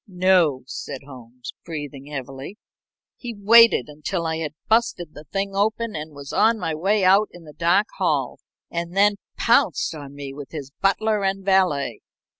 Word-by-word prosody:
"No," 180 -8 +2
said 130 +1 -7
Holmes, 125 -2 -11
breathing 145 -3 -7
heavily. 135 +5 -7 0.6
"He 240 -2 -7
waited 225 - +6
until 155 +4 -4
I 160 0 -1
had 155 -2 -4
busted 220 -8 +1
the 150 - -12
thing 195 +5 -3
open 220 +2 0
and 155 -1 -6
was 140 -1 -9
on 225 +2 +4
my 165 -6 -2
way 195 +6 +1
out 195 +3 +5
in 175 - -13
the 150 -2 -13
dark 180 +7 +2
hall, - - 0 0.3
and 170 +2 -4
then 205 +1 +4 0.2
pounced 230 - +2
on 140 -3 -9
me 140 -1 -7
with 145 +1 -10
his 140 -3 -7
butler 210 +1 +1
and 195 0 -1
valet. 180 - +2
170 Hz, 165 wpm, -23 LUFS, 145-200 Hz, 0.6 s, waited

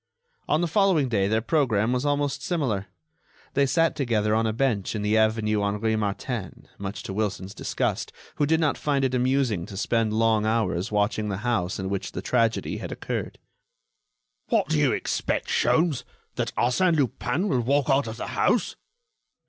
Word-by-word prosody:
On 155 - +2
the 175 - +1
following 170 -6 +3
day 100 -4 +1
their 110 +2 +1
programme 125 -7 +2
was 125 +3 0
almost 145 -1 0
similar. 125 - -1 0.7
They 140 0 +3
sat 165 +4 +2
together 110 -6 +1
on 110 +1 +2
a - - +1
bench 115 -4 0
in 105 - -2
the 105 +1 +2
avenue 110 -1 +2
Henri 105 +2 0
Martin, 105 0 -4
much 100 0 -5
to 95 - -5
Wilson's 100 -2 -2
disgust, - - -2 0.3
who 145 - +2
did 160 +1 +3
not 155 -3 +1
find 140 -2 +1
it 130 - -1
amusing 125 -7 +1
to 95 - -8
spend 115 +1 +1
long 110 -1 +2
hours 110 -5 0
watching 105 +1 0
the 95 - -2
house 105 -7 0
in 95 - -3
which 95 0 -3
the - - -4
tragedy 115 -2 +1
had - - -6
occurred. - - -4 1.1
"What - - +2
do 75 - +2
you - - +3
expect, - - -1
Sholmes? 160 -4 +2 0.3
That - - -2
Arsène 160 +9 +2
Lupin 140 - 0
will 130 -10 +1
walk 140 +3 +1
out 135 -2 +2
of 110 0 -6
the - - -5
house?" - - +1
115 Hz, 175 wpm, -25 LUFS, 105-140 Hz, 1.1 s, following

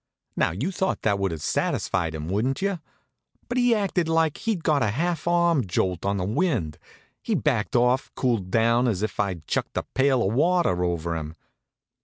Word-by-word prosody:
Now - - +2
you'd 120 - -3
thought 190 +1 -1
that 100 -2 +1
would 100 0 0
have 80 -3 -6
satisfied 85 -4 -1
him, 75 0 -5
wouldn't 110 +9 0
you? 195 -2 -1 0.7
But 245 +1 -1
he 245 -1 +4
acted 190 -5 0
like 160 -2 +2
he'd 215 -7 -2
got 150 -3 +2
a 105 - +2
half 165 +8 -2
arm 170 -4 +3
jolt 90 +1 -1
on 100 0 0
the 90 - -1
wind. 110 - -1 0.4
He - - -1
backed - - 0
off 125 +2 +3
and - - -37
cooled 115 -8 0
down 115 +4 +3
as 105 -4 -1
if 110 - -3
I'd 95 -6 -2
chucked - - -2
a - - 0
pail 130 -5 +1
of 100 - -1
water 160 - +2
over 85 -1 -1
him. 80 0 -5
120 Hz, 195 wpm, -25 LUFS, -, 0.7 s, he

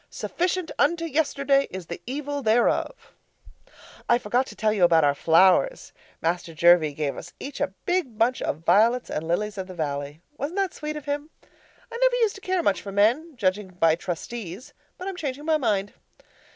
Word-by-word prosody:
Sufficient 360 0 -2
unto 335 +3 +2
yesterday 280 -3 +1
is 185 -1 -7
the 170 - -7
evil 285 +2 -3
thereof. 240 - +1 1.0
I 240 - +6
forgot 245 +3 0
to - - -10
tell 215 -1 +1
you 200 -4 +1
about 165 -2 +5
our 145 -1 +4
flowers. 185 - +3 0.3
Master 170 0 -2
Jervie 165 -3 +5
gave 145 -2 -2
us - - -9
each 280 - -7
a 190 - -1
big 355 -11 -1
bunch 235 +3 +2
of 160 +3 -3
violets 225 +8 +3
and 160 +1 -3
lilies 210 +4 -1
of 185 - -4
the 185 - -9
valley. 145 -2 -4 0.2
Wasn't 300 +8 -4
that 390 -2 0
sweet 305 0 -5
of 300 - -7
him? 290 +1 -3
I 465 - -14
never - - +4
used 455 -4 +2
to 390 - -12
care 370 -2 0
much 195 - +1
for 200 - -7
men 240 +12 +2
judging 200 -2 0
by 170 -3 +2
Trustees 185 - -6 0.2
but 365 - -7
I'm 390 - -4
changing 290 -2 -4
my 320 -1 +3
mind. 205 -7 -1
230 Hz, 185 wpm, -25 LUFS, -, 1.0 s, I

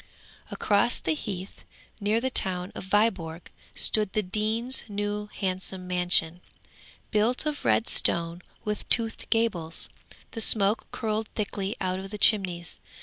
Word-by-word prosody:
'Across 205 +3 +1
the 160 - 0
heath, 185 +4 -7 0.4
near 210 +2 +1
the 260 +2 -2
town 180 -4 -2
of - - -8
Viborg, 190 -5 0 0.2
stood 210 -3 +4
the 215 - 0
Dean's 220 +6 +2
new, 205 0 -3
handsome 185 -2 -4
mansion, 180 -1 +2 0.7
built 225 +6 +1
of 300 -1 -3
red 110 0 +2
stone 170 +1 +2 0.2
with 210 -1 -4
toothed 225 -2 +2
gables. 180 -8 0 0.4
The 225 - -4
smoke 210 0 +3
curled 220 0 -2
thickly 205 -1 -3
out 185 0 -2
of 195 0 -8
the 210 - -6
chimneys. 185 -5 +2
200 Hz, 135 wpm, -27 LUFS, 180-215 Hz, 0.7 s, stood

